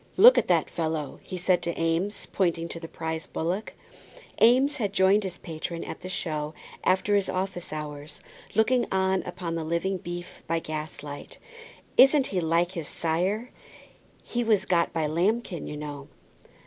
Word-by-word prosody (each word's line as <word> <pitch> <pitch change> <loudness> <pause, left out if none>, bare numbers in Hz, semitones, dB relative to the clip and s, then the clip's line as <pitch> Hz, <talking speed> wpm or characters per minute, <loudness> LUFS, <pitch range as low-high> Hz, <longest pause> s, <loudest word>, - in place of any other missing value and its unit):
"Look - - +10
at - - -2
that - - +3
fellow," 160 -3 -3
he 185 - -6
said 180 0 +2
to 170 - -2
Eames, 165 +5 0
pointing 170 -3 0
to 165 - -5
the 165 - -7
prize 160 0 -4
bullock. 180 +6 -2 0.7
Eames 265 +5 +5
had 205 -6 -1
joined 195 +1 +5
his 185 -3 -5
patron 165 +1 -5
at - - -6
the 185 - -7
show 155 -4 -3 0.3
after 190 +2 +2
his 200 -1 +2
office 185 -1 -3
hours, 150 -1 -6 0.4
looking 240 +3 +3
on 190 0 +2
upon 175 -2 -4
the 165 -1 -2
living 170 +4 -1
beef 175 +1 -7
by 165 0 +1
gaslight. 155 -2 -6 0.6
"Isn't 270 +1 +7
he 185 - +2
like 170 +2 +2
his 165 -5 -5
sire? 185 +9 -1 0.7
He 240 0 -1
was 220 -4 +3
got 170 -2 +2
by 160 -2 0
Lambkin, 180 +3 0
you 150 - -5
know." 145 -2 -6
175 Hz, 160 wpm, -27 LUFS, 160-195 Hz, 0.7 s, Look